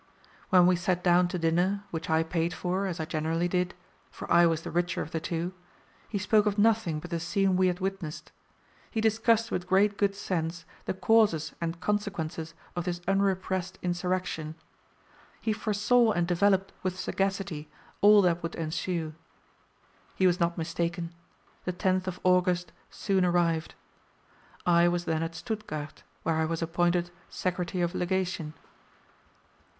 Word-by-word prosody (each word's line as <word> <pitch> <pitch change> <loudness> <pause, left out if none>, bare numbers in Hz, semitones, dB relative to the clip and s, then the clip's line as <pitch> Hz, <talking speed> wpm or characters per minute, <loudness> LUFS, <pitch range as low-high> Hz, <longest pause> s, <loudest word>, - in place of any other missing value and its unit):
When 180 -1 +6
we 180 0 +5
sat 180 0 0
down 175 0 +5
to 180 - -3
dinner, 175 +4 +1
which 165 -1 -4
I 160 0 +3
paid 165 +1 -1
for, 190 +2 -1
as 175 -3 -4
I 160 - -1
generally 160 +2 -1
did, 180 0 -1 0.3
for - - -8
I 170 0 +7
was 165 -1 0
the - - -5
richer 175 +1 0
of 160 - -10
the 165 - -1
two, 170 +3 -3 0.6
he 210 - -2
spoke 210 +1 +3
of 205 0 0
nothing 210 -7 +2
but 175 +3 -10
the 170 - -1
scene 185 +3 +1
we 185 0 +4
had 180 0 -1
witnessed. 190 -5 -4 0.6
He 225 - -2
discussed 225 +1 +2
with 180 0 -2
great 200 +2 +3
good 200 -1 +2
sense 170 -3 -3 0.2
the - - -2
causes 205 -6 +3
and 170 0 -3
consequences 170 -5 -2 0.2
of 175 -1 -2
this 175 -1 -2
unrepressed 190 -1 0
insurrection. 175 -3 -2 0.8
He 220 - 0
foresaw 215 +2 +2
and 175 -2 0
developed 195 +2 +2
with 185 -1 -2
sagacity 190 -6 -2 0.3
all 205 0 +7
that 175 -1 +2
would 165 0 -4
ensue. 165 0 -2 1.0
He 190 - +2
was 180 -1 +3
not 170 0 +1
mistaken. 170 +1 -2 0.5
The 180 - -1
10th 185 0 0
of 185 -1 -4
August 180 -2 +2 0.2
soon 195 -2 0
arrived. 170 -2 +1 0.9
I 170 0 +5
was 175 0 0
then 160 -1 0
at 165 0 -3
Stuttgart, 210 -10 -5 0.2
where 160 -1 +1
I 160 - +2
was 165 +1 -2
appointed 175 +1 +1 0.2
Secretary 180 0 -2
of 175 +1 -1
Legation. 180 -4 -2
180 Hz, 155 wpm, -28 LUFS, 165-190 Hz, 1.0 s, I